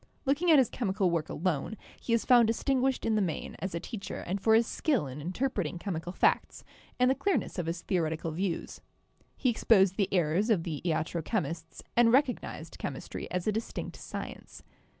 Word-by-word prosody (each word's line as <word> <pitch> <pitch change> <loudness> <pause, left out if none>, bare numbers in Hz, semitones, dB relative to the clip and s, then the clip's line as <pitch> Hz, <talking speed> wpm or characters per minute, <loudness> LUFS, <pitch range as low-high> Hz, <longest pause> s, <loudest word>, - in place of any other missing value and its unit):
Look 280 +3 +1
ing 355 - +2
at 315 - +8
his 260 -5 +4
chemical 195 -5 0
work 165 -3 -1
alone, 180 +4 -2 0.2
he - - -4
is 230 -1 +2
found 240 -3 +6
distinguished 260 +3 +1
in 225 - +2
the 215 - +2
main 175 -5 -3
as 185 0 -4
a - - -1
teacher 200 +3 -6
and 190 +2 -3
for 220 +2 +5
his 230 +1 +5
skill 270 - 0
in 135 +2 -7
interpreting 185 - -2
chemical 175 -2 -4
facts - - +1 0.4
and 250 - +5
the 260 - +5
clearness 300 - -1
of 170 - -2
his 165 0 -3
theoretical 165 -3 -1
views. 175 +1 -3 0.6
He 255 - +2
exposed 195 -4 +4
the 200 -3 +1
errors 180 +4 +2
of 195 -7 +3
the 160 -4 -4
iatro 165 0 -1
chemists 165 -5 -3
and 235 -1 +5
recognised 260 0 0
chemistry - - -5
as 180 -1 -2
a 215 - +2
distinct 225 +2 -4
science. - - -8
195 Hz, 190 wpm, -30 LUFS, 170-235 Hz, 0.6 s, at